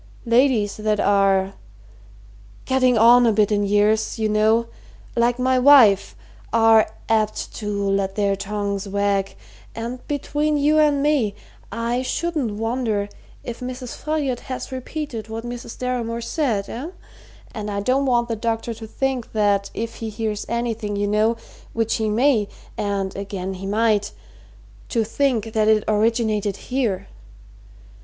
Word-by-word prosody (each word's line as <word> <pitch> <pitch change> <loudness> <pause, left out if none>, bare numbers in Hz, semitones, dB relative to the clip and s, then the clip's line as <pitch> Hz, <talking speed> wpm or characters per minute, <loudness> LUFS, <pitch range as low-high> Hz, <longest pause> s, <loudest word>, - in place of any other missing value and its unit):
"Ladies 235 -3 +2
that 215 -1 0
are 195 -1 +2 1.1
getting 255 -2 +3
on 240 +2 +7
a - - +4
bit 210 0 +2
in 205 -1 +2
years, 210 +3 +2
you 220 -1 0
know 215 +2 +3 0.5
like 240 +1 +2
my 255 0 +2
wife, 250 -8 +6 0.4
are 225 -1 +5 0.2
apt 215 -1 0
to 210 -2 -4 0.2
let 195 -1 0
their 200 -1 +1
tongues 200 0 -3
wag, 200 0 0 0.4
and 235 +2 -5
between 295 +1 -1
you 300 +2 +3
and 290 -2 +3
me, 270 -9 +1 0.4
I 235 +2 -1
shouldn't 295 -4 -2
wonder 220 -2 -1 0.3
if 240 -1 -6
Mrs. 250 0 -6
Folliot 290 -5 -2
has 260 0 -6
repeated 260 -3 -5
what 225 +1 -5
Mrs. 240 -1 -7
Deramore 235 -2 -2
said 230 -9 -1
eh? 265 +8 -6 0.6
And 210 -1 -5
I 200 -1 -2
don't 260 +6 +1
want 240 -2 +2
the 230 - -2
doctor 225 +1 -2
to 220 0 -9
think 265 0 -3
that 205 -2 +1
if 230 +1 -4
he 225 - -4
hears 215 -1 -3
anything, 230 -3 -2
you 205 0 0
know, 215 +3 +2 0.4
which 225 -1 0
he 220 -1 -1
may, 225 -1 +2 0.3
and, 200 -2 -2
again, 195 -1 -4
he 190 +1 -7
might 210 0 +1 0.8
to 230 -3 +1
think 225 -2 -1
that 215 -1 +2
it 215 -1 +4
originated 215 -2 +1 0.2
here. 230 -8 0
225 Hz, 145 wpm, -22 LUFS, 205-250 Hz, 1.1 s, on